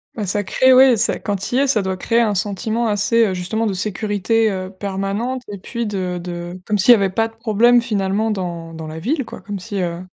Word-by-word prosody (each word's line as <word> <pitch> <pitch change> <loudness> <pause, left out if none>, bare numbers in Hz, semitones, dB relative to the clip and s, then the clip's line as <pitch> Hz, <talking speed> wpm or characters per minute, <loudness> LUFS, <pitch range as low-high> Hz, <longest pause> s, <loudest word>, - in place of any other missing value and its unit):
Bah 215 - -3
ça 205 +2 -1
crée 260 +6 +4
oui, 255 -2 +6
ça 225 - +1
quand 205 -1 -2
tu 195 +5 -4
y 260 - +3
es, 280 - +2
ça 220 -7 +2
doit 190 0 -2
créer 230 +5 +1
un 220 -3 +2
sentiment 215 +4 -1
assez, 220 +2 +2
heu, 190 - -2
justement 220 +6 -2
de 200 - -1
sécurité, 215 +3 0
heu, 185 0 -5
permanente 200 +6 -3
et 200 - -7
puis 235 +4 -4
de 185 -3 -3
de 175 +1 -6
comme 210 -1 0
s'il 240 +6 +7
y - - +7
avait 195 -3 0
pas 225 +3 +1
de 225 - -18
problème 235 +1 +4
finalement 215 -1 -1
dans 170 -4 -4
dans 160 -1 -7
la 155 +1 -7
ville 270 - -1
quoi, - - -10
comme 205 -2 -6
si, 200 +1 -5
heu 175 -1 -3
205 Hz, 240 wpm, -19 LUFS, 185-230 Hz, -, s'il